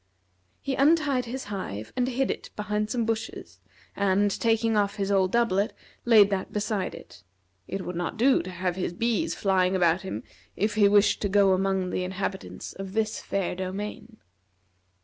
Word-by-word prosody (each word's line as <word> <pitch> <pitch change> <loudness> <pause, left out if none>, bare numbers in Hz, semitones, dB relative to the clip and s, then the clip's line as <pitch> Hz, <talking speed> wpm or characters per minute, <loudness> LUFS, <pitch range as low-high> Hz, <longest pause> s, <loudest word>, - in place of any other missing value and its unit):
He 275 - -1
untied 280 -2 +3
his 260 +3 -5
hive, 145 - -6
and 250 0 +1
hid 265 +1 0
it - - -6
behind 210 0 -2
some 235 -2 0
bushes, 225 0 -4 0.4
and 200 +1 +2
taking 225 +1 +1
off 200 -1 +1
his 200 -1 -2
old 190 -2 +3
doublet, 220 -3 +1 0.3
laid 215 -4 +6
that 190 -1 -2
beside 210 -2 -2
it. - - -14 0.4
It 195 -1 -4
would 180 - -5
not 175 +4 -3
do 260 +4 +4
to 185 - -8
have 180 0 -2
his 180 -2 -2
bees 235 - 0
flying 190 -1 +2
about 175 0 +3
him 120 - -5 0.3
if 210 +1 0
he 210 -1 +5
wished 205 +1 +4
to 205 - 0
go 200 -1 +4
among 190 -1 0
the 185 - -1
inhabitants 190 +1 -5
of 195 -1 -7
this 220 0 -1
fair 195 -2 -2
domain. 200 +5 -6
200 Hz, 170 wpm, -26 LUFS, 190-225 Hz, 0.4 s, laid